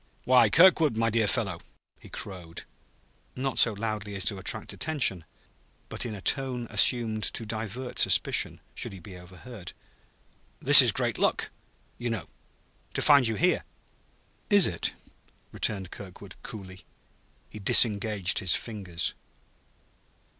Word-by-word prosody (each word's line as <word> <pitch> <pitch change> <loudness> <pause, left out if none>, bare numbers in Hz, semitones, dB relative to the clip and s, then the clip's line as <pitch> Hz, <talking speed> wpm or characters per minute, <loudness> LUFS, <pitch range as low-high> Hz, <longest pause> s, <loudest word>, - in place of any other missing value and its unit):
"Why, 125 0 +4
Kirkwood, 165 -7 +4
my 115 0 0
dear 110 -1 +1
fellow!" 95 - -1 0.4
he - - -15
crowed 90 -4 -8 0.7
not 135 0 -2
so 115 - +5
loudly 105 -1 -5
as 95 -3 -1
to 95 +4 0
attract - - -4
attention, 130 - -1 0.6
but - - -4
in 110 - -6
a 100 - -10
tone 130 +2 -1
assumed 115 -3 +2
to 115 - -3
divert 115 +3 -6
suspicion, - - +2
should - - -4
he 95 - -10
be 90 +2 -12
overheard. 90 +3 -12 0.9
"This - - +10
is - - +4
great - - -2
luck, - - 0 0.5
you 120 0 -3
know 110 -7 -4 0.7
to - - 0
find 140 -5 +5
you 110 - -1
here." 180 +8 +1 0.9
"Is 205 -4 +6
it?" 85 - -3 0.6
returned 95 -4 -2
Kirkwood 95 -3 -11
coolly. 95 -3 -11 0.7
He 105 - -10
disengaged 100 -2 +3
his 95 -4 0
fingers. 95 -7 -4
110 Hz, 130 wpm, -27 LUFS, 95-125 Hz, 0.9 s, This